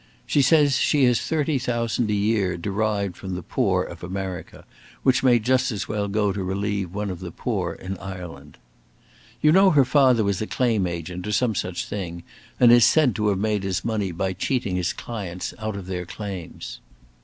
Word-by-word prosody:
She 145 - +2
says 145 0 +4
she 145 -2 +3
has 125 -2 +4
thirty 155 -3 0
thousand 120 -2 -1
a - - +1
year 100 -3 +1
derived 100 0 -1
from 95 0 -6
the 90 - -5
poor - - +1
of - - -10
America, 95 -2 -6 0.4
which 130 -1 +3
may 125 -2 +5
just 130 +3 +1
as 105 -3 -4
well 105 -1 -2
go 105 -1 +1
to 100 -1 -3
relieve 100 0 -2
one 105 +1 -3
of 90 - -6
the 90 -2 -6
poor 90 -4 -3
in 95 +1 -7
Ireland. 85 -7 -9 0.8
You 150 - +5
know 190 +3 +6
her 145 -6 +5
father 130 -4 +4
was 100 -1 0
a 110 - -2
claim 115 -7 +1
agent, 85 +2 -5
or - - -2
some 110 +2 +2
such 90 -3 -3
thing, 85 -4 -5 0.4
and 120 -1 +7
is 120 -1 +7
said 150 -3 +4
to 105 -1 +1
have 100 -2 +2
made 105 0 0
his 95 -2 -2
money 105 -5 -1
by 95 +3 -2
cheating 100 0 -1
his 90 -1 0
clients 95 -6 -6
out 110 -1 -3
of 100 -2 -6
their 90 -1 -4
claims. 90 - -7
100 Hz, 195 wpm, -24 LUFS, 90-120 Hz, 0.8 s, and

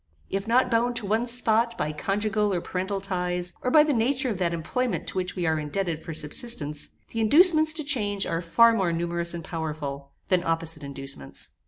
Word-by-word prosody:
If 195 +2 -2
not 245 +2 +3
bound 240 +1 +1
to 240 -3 -2
one 220 +4 0
spot 235 -1 +2
by 150 +1 -1
conjugal 210 +5 0
or 180 - 0
parental 190 +3 -3
ties, 180 -2 -2
or 250 - 0
by 300 +3 +7
the 300 -1 +1
nature 255 +2 +1
of 195 - -4
that 175 -2 +1
employment 200 +10 -2
to - - -9
which 185 -1 -2
we 180 -2 -2
are 160 -1 +1
indebted 160 +1 -3
for - - -6
subsistence, 150 -1 -1 0.2
the 230 - -4
inducements 310 - +6
to 310 -1 -2
change 205 -9 0
are 165 - -2
far 230 +7 +5
more 190 -6 +1
numerous 170 0 -2
and 170 - -6
powerful, 150 -4 -5 0.2
than 180 -2 +2
opposite 165 -2 -2
inducements. 135 - -8
190 Hz, 195 wpm, -26 LUFS, 165-230 Hz, 0.2 s, by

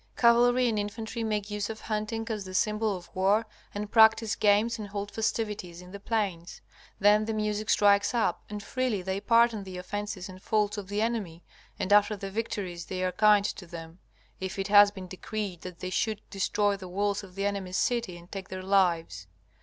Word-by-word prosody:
Cavalry 245 +1 +5
and 220 -3 0
infantry 220 +3 -4
make 210 -2 -2
use 205 0 -2
of 220 0 -6
hunting 215 +1 -3
as 210 -2 -3
the 185 0 -8
symbol 215 0 +1
of 175 - -15
war 200 +4 +3 0.3
and 205 0 -5
practise 220 -1 +5
games 215 +3 +2
and 210 - -5
hold 200 0 -5
festivities 210 -6 -2
in 180 0 -12
the 200 - -8
plains. 200 -5 -2 0.4
Then 210 +1 +5
the 225 0 -2
music 210 0 -2
strikes 205 +2 +4
up, 220 -7 0
and 205 -1 -6
freely 250 -7 -1
they 190 +1 -2
pardon 230 -2 +3
the 190 -1 -8
offences 200 +1 -5
and 185 -1 -11
faults 210 -1 +1
of 195 - -8
the 205 +2 -1
enemy, 205 -8 -3 0.3
and 195 - 0
after 210 +1 +5
the 195 0 -6
victories 190 -5 -4
they 185 -1 -3
are 185 - +1
kind 210 +1 +4
to 185 -3 -4
them, 165 +1 -9 0.4
if 190 +1 -4
it 195 +1 -2
has 205 0 +8
been 190 -2 -9
decreed 190 -1 -5
that 180 -2 -9
they 185 - -4
should 215 +1 -1
destroy 205 +1 +1
the 190 -2 -9
walls 200 +2 -1
of 185 -2 -13
the 195 0 -2
enemy's 195 -2 -2
city 235 -8 0
and 175 +1 -16
take 195 -1 -7
their 185 0 -6
lives. 170 - +1
205 Hz, 200 wpm, -28 LUFS, 185-215 Hz, 0.4 s, has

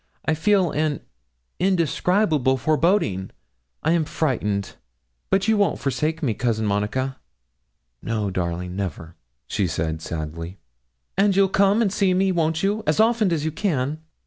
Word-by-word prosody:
I 160 - +2
feel 185 +1 +2
an 150 -1 -1 0.6
indescribable 170 - +2
foreboding. 155 - +1 0.5
I 160 - +2
am 170 -1 +3
frightened; 105 -11 -1 0.5
but 195 +2 +2
you 220 -1 +3
won't 200 -1 +2
forsake 155 +4 -2
me, 120 -6 +1
Cousin 110 -2 -1
Monica.' 105 +6 -1 0.8
'No, 110 -3 -2
darling, 90 0 -3
never,' 85 -4 -5 0.3
she 95 +8 -1
said, 80 0 -2
sadly. 85 +3 -5 0.6
'And 200 -1 +4
you'll 195 0 +4
come 200 +4 +3
and 200 -3 0
see 190 -3 +2
me, 190 +1 +2
won't 160 -1 0
you, 205 +2 +1
as - - +2
often 220 -3 +3
as 155 -2 0
you 160 - 0
can?' 155 -4 -1
155 Hz, 145 wpm, -23 LUFS, -, 0.8 s, And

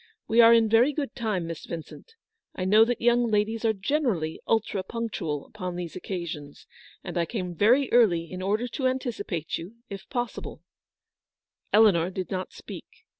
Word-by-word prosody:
We 230 +2 +5
are 230 0 +8
in 230 -1 +5
very 235 +6 +4
good 285 -1 -3
time, 215 -8 -2
Miss 165 -1 -7
Vincent. 170 - -9 0.4
I 185 - -3
know 210 +4 +6
that 240 0 -2
young 240 0 +3
ladies 215 +2 0
are 225 - +4
generally 200 - -1
ultra 220 -3 +1
punctual 185 -10 -4
upon 185 -4 -6
these 175 -2 -6
occasions; 170 -6 -6 0.4
and - - -3
I 170 - 0
came 185 -6 -4
very 240 - +4
early 205 -9 +4
in 185 0 -6
order 210 +6 0
to 260 +2 -1
anticipate 225 - -3
you, 180 +7 -9 0.2
if 195 -1 -8
possible/' 245 -3 -4 1.1
Eleanor 200 -6 +5
did 185 -1 -5
not 185 -1 -3
speak. - - -11
210 Hz, 165 wpm, -26 LUFS, 180-235 Hz, 1.1 s, are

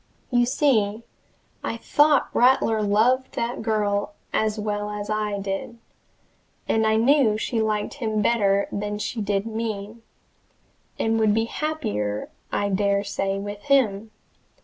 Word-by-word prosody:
You 245 -1 +3
see 225 -6 +1 0.6
I 230 - -3
thought 290 +4 +3
Rattler 240 -3 +3
loved 225 +6 +2
that 235 +1 -2
girl 205 -2 -1 0.2
as 215 0 +1
well 210 0 -2
as 210 0 -5
I 210 -1 -1
did, 195 +4 -4 0.9
and 220 0 +2
I 220 - +3
knew 235 -1 +4
she 225 +1 -1
liked 215 -1 -1
him 220 -6 -2
better 200 -2 +2
than 205 +1 -3
she 220 +2 -3
did 200 0 -1
me, 220 -1 -4 1.0
and 225 0 +1
would 215 -1 +3
be 225 0 +2
happier 225 - -3 0.2
I 205 - 0
dare 200 0 +1
say 195 -1 -2
with 205 +1 -6
him. 225 -7 +2
215 Hz, 135 wpm, -24 LUFS, 205-230 Hz, 1.0 s, knew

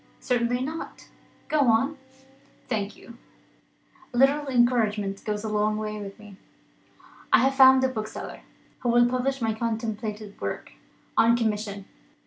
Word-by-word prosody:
"Certainly 245 0 0
not. 315 +4 -7 0.4
Go 310 -1 +1
on." 265 +6 +2 0.7
"Thank 210 -4 -2
you; 235 0 -14 0.9
a 245 - -5
little 280 +3 +3
encouragement 220 -6 +1
goes 210 0 -3
a - - -3
long 215 0 +1
way 215 -1 -4
with 200 -1 -8
me. 210 -2 -14 0.9
I - - +7
have 270 +1 +3
found 265 -1 +7
a - - +4
bookseller, 220 -4 -6 0.4
who 245 - -1
will 240 0 +5
publish 255 +1 -1
my 220 -1 +1
contemplated 220 -2 -4
work, - - -4 0.4
on 230 +1 +5
commission. 210 -3 -2
230 Hz, 135 wpm, -26 LUFS, 210-255 Hz, 0.9 s, I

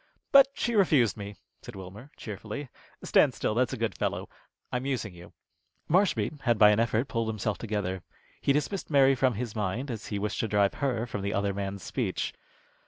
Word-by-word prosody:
"But 275 -1 +9
she 240 - -1
refused 155 - +4
me," 100 -1 -7 0.3
said - - -10
Wilmer, 95 +8 -10
cheerfully. 110 +6 -6 0.3
"Stand - - +4
still, - - -1
that's 120 +1 +1
a - - -3
good - - -1
fellow. - - -2 0.4
I'm 125 +2 -2
using 115 -8 -2
you." 85 0 -13 0.6
Marshby 175 -4 +1
had 120 -3 +2
by 105 0 +7
an 105 - +2
effort 115 +2 +1
pulled 115 -1 -1
himself 105 -3 -2
together. 100 -4 -2 0.4
He - - +2
dismissed 150 +7 -1
Mary 135 -2 +5
from 130 -2 +2
his 115 0 -4
mind, 110 +6 -2
as 115 -2 -6
he 105 - -3
wished 100 -1 -2
to 115 - 0
drive 100 -2 +2
her 125 -5 -1
from 110 -4 -5
the 100 +1 -2
other 100 0 0
man's 100 -1 -4
speech. - - -2
110 Hz, 190 wpm, -28 LUFS, 100-135 Hz, 0.6 s, But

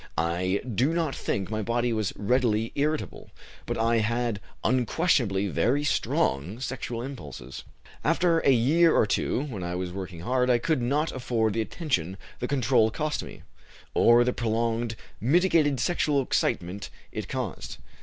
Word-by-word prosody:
I 90 +4 0
do 125 - +1
not 160 -5 0
think 100 +1 -2
my 110 0 -1
body 120 +2 0
was 110 -4 -1
readily 115 0 +1
irritable, 150 +2 -2 0.4
but - - -2
I 115 +1 +2
had 115 0 0 0.2
unquestionably 120 - +2
very 120 - +1
strong 95 - 0
sexual 125 -3 -4
impulses. 125 - -8 0.4
"After 165 +1 +3
a 140 - +2
year 150 +7 +4
or - - +4
two, 120 +5 0
when 120 -10 -6
I 90 0 -3
was 90 -1 -3
working 90 -3 -6
hard, 125 +5 +1
I 125 - +5
could 130 +3 0
not 145 +6 0
afford 120 -4 0
the 115 - 0
attention 105 - -2 0.2
the 125 - -2
control 125 -4 +3
cost 150 +7 -2
me, - - -10 0.5
or 120 +1 +6
the 125 +1 0
prolonged 115 0 -1 0.2
mitigated 155 - +3
sexual 150 -4 +1
excitement 95 -4 -1 0.2
it - - -5
caused. - - -4
120 Hz, 150 wpm, -27 LUFS, 105-140 Hz, 0.5 s, or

